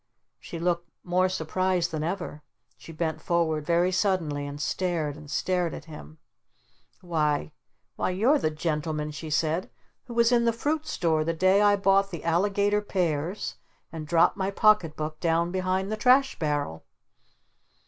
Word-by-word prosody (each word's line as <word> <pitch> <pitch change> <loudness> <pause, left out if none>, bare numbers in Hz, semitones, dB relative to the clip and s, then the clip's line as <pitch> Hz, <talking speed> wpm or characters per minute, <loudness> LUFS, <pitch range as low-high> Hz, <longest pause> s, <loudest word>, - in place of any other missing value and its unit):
She 170 - -8
looked 170 0 -1
more 185 +1 +2
surprised 185 0 0
than 155 -1 -3
ever. 170 -3 -4 0.3
She - - -12
bent 160 -1 -3
forward 160 -3 0
very 175 +2 +3
suddenly 175 -7 0
and 145 0 -7
stared 165 -3 -1
and 150 -1 -12
stared 180 +1 0
at - - -9
him. 80 - -11 0.8
"Why 155 -4 0 0.5
Why - - 0
you're 230 +11 +3
the 155 - +1
gentleman," 150 -1 -2
she 155 +1 -7
said, 160 +3 0 0.4
"who 240 - -9
was 235 0 +4
in 235 -1 +3
the 230 - +3
Fruit 305 +6 -2
Store 165 - +1
the 165 +2 -1
day 185 +4 +3
I 205 -1 +5
bought 195 0 +3
the 170 -5 -7
Alligator 200 +4 +2
pears 175 -2 -2 0.3
and 155 -2 -7
dropped 165 +4 +3
my 190 0 -1
pocket 200 -6 +3
book 155 0 -5
down 170 0 +1
behind 185 +1 -1
the 215 - -2
trash 260 +4 +3
barrel?" 145 - -2
170 Hz, 160 wpm, -27 LUFS, 155-195 Hz, 0.8 s, I